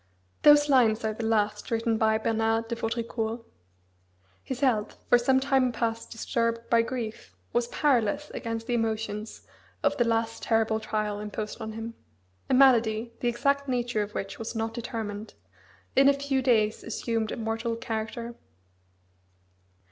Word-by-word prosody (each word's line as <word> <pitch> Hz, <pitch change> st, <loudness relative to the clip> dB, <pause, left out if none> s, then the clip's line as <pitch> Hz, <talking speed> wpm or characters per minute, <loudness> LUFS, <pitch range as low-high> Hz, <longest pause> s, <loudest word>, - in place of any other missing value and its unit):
Those 295 Hz, 0 st, +7 dB
lines 235 Hz, -5 st, +4 dB
are 215 Hz, -, 0 dB
the 225 Hz, -, -6 dB
last 210 Hz, -2 st, 0 dB
written 230 Hz, -1 st, 0 dB
by 220 Hz, 0 st, +3 dB
Bernard 225 Hz, 0 st, 0 dB
de 235 Hz, -, -1 dB
Vaudricourt. 230 Hz, 0 st, -3 dB, 1.0 s
His 260 Hz, 0 st, -6 dB
health, 230 Hz, -6 st, +1 dB
for 245 Hz, -, +6 dB
some 260 Hz, +2 st, +3 dB
time 265 Hz, -2 st, +2 dB
past 230 Hz, -1 st, -2 dB
disturbed 230 Hz, 0 st, -1 dB
by 230 Hz, -1 st, +6 dB
grief, 230 Hz, -, -5 dB, 0.2 s
was 240 Hz, 0 st, +1 dB
powerless 265 Hz, +1 st, +1 dB
against 230 Hz, 0 st, -4 dB
the 245 Hz, -, -2 dB
emotions 220 Hz, -2 st, -2 dB, 0.4 s
of 290 Hz, -1 st, +2 dB
the 240 Hz, -, +4 dB
last 225 Hz, -1 st, 0 dB
terrible 225 Hz, -1 st, +1 dB
trial 215 Hz, -1 st, -2 dB
imposed 210 Hz, +2 st, -5 dB
on 220 Hz, 0 st, -5 dB
him. 225 Hz, +1 st, -6 dB, 0.6 s
A -, -, +4 dB
malady, 235 Hz, -3 st, +4 dB
the 245 Hz, -, -1 dB
exact 280 Hz, +4 st, +1 dB
nature 245 Hz, -3 st, 0 dB
of 205 Hz, 0 st, -5 dB
which 195 Hz, 0 st, -4 dB
was 225 Hz, +1 st, -5 dB
not 225 Hz, 0 st, -2 dB
determined, 225 Hz, -3 st, -5 dB, 0.6 s
in 275 Hz, +1 st, +7 dB
a -, -, +5 dB
few 280 Hz, -1 st, -1 dB
days 220 Hz, -4 st, +2 dB
assumed 225 Hz, -1 st, -2 dB
a -, -, -4 dB
mortal 225 Hz, +1 st, -2 dB
character. 230 Hz, +1 st, -4 dB
230 Hz, 150 wpm, -27 LUFS, 220-245 Hz, 1.0 s, Those